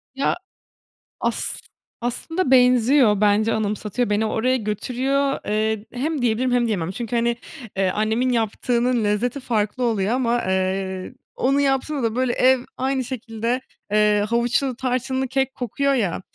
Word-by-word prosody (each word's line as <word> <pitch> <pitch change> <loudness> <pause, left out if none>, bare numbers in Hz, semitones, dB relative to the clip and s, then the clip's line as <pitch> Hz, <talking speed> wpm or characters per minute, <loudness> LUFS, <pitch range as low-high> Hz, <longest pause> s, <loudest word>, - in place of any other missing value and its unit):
Ya, 275 - +1 0.8
as - - -1 0.4
aslında 265 +6 -2
benziyor. 250 -3 +5
Bence 215 +2 +3
anımsatıyor, 210 +2 -1
beni 210 +1 +1
oraya 225 +4 +1
götürüyor. 260 +6 -1
Eee, 215 0 0
hem 290 +3 -2
diyebilirim 245 +2 +1
hem 245 -1 +3
diyemem. 185 -7 -1
Çünkü, 235 +3 -4
hani, 235 0 +1 0.4
eee, 195 -1 +2
annemin 220 +6 0
yaptığının 235 +1 +1
lezzeti 220 +6 0
farklı 225 -1 -1
oluyor 220 -3 +1
ama, 240 -1 +1
eee, 190 +2 -1 0.2
onun 275 +2 +2
yaptığını 275 0 0
da 225 -1 0
böyle 255 -1 +1
ev 260 0 +4 0.2
aynı 265 0 0
şekilde, 235 0 -3 0.3
eee, 210 -1 +3
havuçlu, 240 +3 +1
tarçınlı 260 +1 -1
kek 265 0 0
kokuyor, 275 +3 0
ya. 200 -10 0
240 Hz, 135 wpm, -22 LUFS, 215-260 Hz, 0.8 s, benziyor